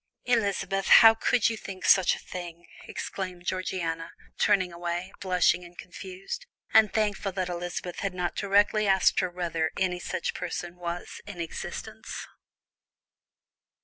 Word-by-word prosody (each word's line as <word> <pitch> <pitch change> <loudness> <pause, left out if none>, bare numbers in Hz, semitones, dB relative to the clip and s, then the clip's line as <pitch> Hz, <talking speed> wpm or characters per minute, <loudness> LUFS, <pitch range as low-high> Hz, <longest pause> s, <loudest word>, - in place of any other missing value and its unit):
"Elizabeth! 200 -4 +1
how 225 0 +9
could 230 +2 +2
you 230 - 0
think 190 -4 -8
such 190 -2 +5
a - - -13
thing?" 175 -1 -7 0.2
exclaimed 180 -2 -5
Georgiana, 175 -3 -2 0.3
turning 185 -4 +3
away, 175 +2 -4
blushing 180 -1 +2
and 175 0 -14
confused, 190 - -7 0.3
and 220 -2 +6
thankful 210 -2 0
that 185 -1 -2
Elizabeth 175 0 -4
had 195 -2 -2
not 180 -1 -2
directly 205 +1 +3
asked 190 -1 +4
her 185 - 0
whether 170 -3 -1
any 180 -2 0
such 175 - -3
person 175 -1 -5
was 175 0 -5
in 200 -4 -8
existence. 165 -1 -6
185 Hz, 135 wpm, -28 LUFS, 175-195 Hz, 0.3 s, how